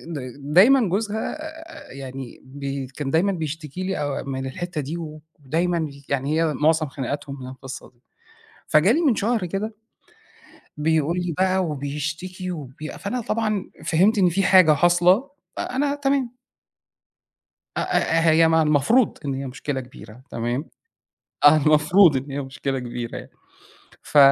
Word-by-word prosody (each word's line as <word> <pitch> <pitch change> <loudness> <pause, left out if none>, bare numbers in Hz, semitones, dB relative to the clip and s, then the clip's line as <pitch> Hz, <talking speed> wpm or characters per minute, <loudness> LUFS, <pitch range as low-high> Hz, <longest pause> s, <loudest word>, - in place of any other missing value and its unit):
د - - -3 0.4
دايمًا 235 +2 +6
جوزها 215 - -2 0.5
يعني 135 -2 -8
ب 135 0 -5
كان 140 -2 -3
دايمًا 180 +6 +3
بيشتكي 160 0 -5
لي 190 +1 -2
آآ 145 -2 -2
من 135 0 -4
الحِتّة 170 +3 -4
دي 150 +5 -5 0.4
ودايمًا 165 +3 -1 0.2
يعني 140 +3 0
هي 160 -2 +1
مُعظم 155 +1 +2
خناقاتهم 140 +1 -5
من 125 - -7
القِصّة 130 0 -9
دي، 120 - -35 0.7
فجالي 190 - +4
من 290 -8 +3
شهر 220 -2 0
كده 200 +5 -4 1.0
بيقول 160 +2 +1
لي 175 -1 -2
بقى 190 0 +2
وبيشتكي 160 +6 -4
وبي 150 -2 -7
فأنا 205 +7 -4
طبعًا 215 -3 -2
فهِمت 190 +7 +3
إن 185 -3 +4
في 195 +3 0
حاجة 185 -5 +6
حاصلة، 175 - +3 0.3
فأنا 280 +2 -1
تمام. 270 -3 -1 1.4
أ - - +1
آآ، 165 0 +2
هي 165 +1 +5
ما 160 0 +4
المفروض 155 - +3
إن 140 - -1
هي 135 +1 -4
مشكلة 130 +1 -4
كبيرة 125 -2 -13
تمام، 120 +6 -2 0.8
آه 145 +1 +8
المفروض 155 +2 +5
إن 135 +2 -5
هي 140 - -3
مشكلة 135 0 -3
كبيرة 120 -1 -5
يعني - - -10 0.7
ف - - -2
160 Hz, 140 wpm, -23 LUFS, 140-185 Hz, 1.4 s, آه